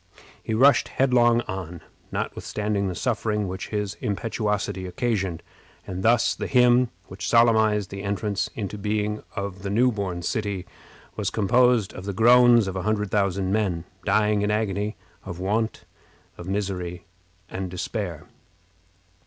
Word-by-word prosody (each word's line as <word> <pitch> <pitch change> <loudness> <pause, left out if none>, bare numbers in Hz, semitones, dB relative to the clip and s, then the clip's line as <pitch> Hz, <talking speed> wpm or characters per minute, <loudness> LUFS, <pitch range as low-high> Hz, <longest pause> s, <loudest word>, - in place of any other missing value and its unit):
He 110 - -2
rushed 135 +5 +5
headlong 120 -3 +3
on, 95 -5 -6 0.3
notwithstanding 105 -1 -2
the 90 - -3
suffering 105 -3 -1
which 95 +1 -5
his 105 -2 -2
impetuosity 105 -2 -2
occasioned, 95 -3 -2 0.4
and 95 0 -5
thus 115 +3 +3
the - - -4
hymn 125 -1 +4 0.2
which 95 0 -6
solemnized 110 -4 +4
the 100 0 -6
entrance 100 0 -2
into 105 -1 -5
being 105 +1 -1
of 100 -2 -4
the 100 - -4
new 120 +5 +3
born 95 -5 -4
city 100 -1 -2 0.5
was - - -1
composed 120 0 +3
of 95 - -8
the 100 - -3
groans 120 +1 +6
of 95 - -4
a 95 - -2
hundred 105 0 -1
thousand 100 -2 +1
men, 95 -6 0 0.2
dying 105 -1 +2
in 105 - 0
agony, 105 0 -1 0.3
of 90 -3 -7
want, 110 +4 -1 0.6
misery, 90 -2 -3 0.4
and 95 -2 -5
despair. 90 -1 -4
105 Hz, 135 wpm, -25 LUFS, 95-110 Hz, 0.6 s, groans